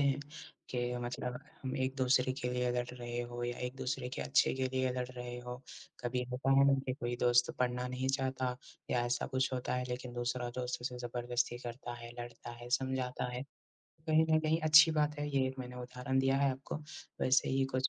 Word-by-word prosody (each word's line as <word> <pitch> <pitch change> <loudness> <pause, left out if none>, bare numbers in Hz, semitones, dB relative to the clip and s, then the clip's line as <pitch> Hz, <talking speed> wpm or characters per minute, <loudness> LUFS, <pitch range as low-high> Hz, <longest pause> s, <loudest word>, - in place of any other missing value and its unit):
हैं 140 0 +3 0.5
के 125 0 -1
मतलब 125 0 -3 0.2
हम 130 - -2
एक-दूसरे 130 -1 +2
के 125 - -1
लिए 125 0 +1
लड़ 125 0 0
रहे 120 -1 -4
हो 120 0 -5
या 120 0 -3
एक-दूसरे 125 0 -3
के - - -2
अच्छे 135 - +4
के 130 0 0
लिए 130 -1 +2
लड़ 125 -1 -2
रहे 125 -1 -6
हो। 125 0 -6 0.5
कभी 125 +1 0
होता 130 +2 0
है 140 - +7
ना 140 - +6
कि 130 - +1
कोई 120 -3 -3
दोस्त 120 0 +5
पढ़ना 125 0 +1
नहीं 130 +1 -2
चाहता 130 -2 0 0.3
या 120 -1 +2
ऐसा 120 0 0
कुछ 130 0 0
होता 125 0 -1
है 125 0 0
लेकिन 125 0 -4
दूसरा 120 0 -1
दोस्त 125 -1 -2
उसे 125 0 -3
ज़बरदस्ती 120 0 -1
करता 120 0 -6
है, 120 0 -9
लड़ता 120 0 -8
है, 120 +1 -9
समझाता 130 -2 0
है, 125 +1 -3 0.7
कहीं 155 +1 +6
न 155 - +6
कहीं 160 +1 +2
अच्छी 155 +1 +9
बात 150 -1 +1
है 145 0 -1
ये 135 -2 +2
एक 130 0 -5
मैंने 125 -1 -6
उदाहरण 125 +1 -2
दिया 135 0 +3
है 140 0 +3
आपको। 135 +3 -5 0.4
वैसे 130 0 +4
ही 135 0 +2
कुछ 130 0 +2
125 Hz, 205 wpm, -34 LUFS, 125-130 Hz, 0.7 s, अच्छी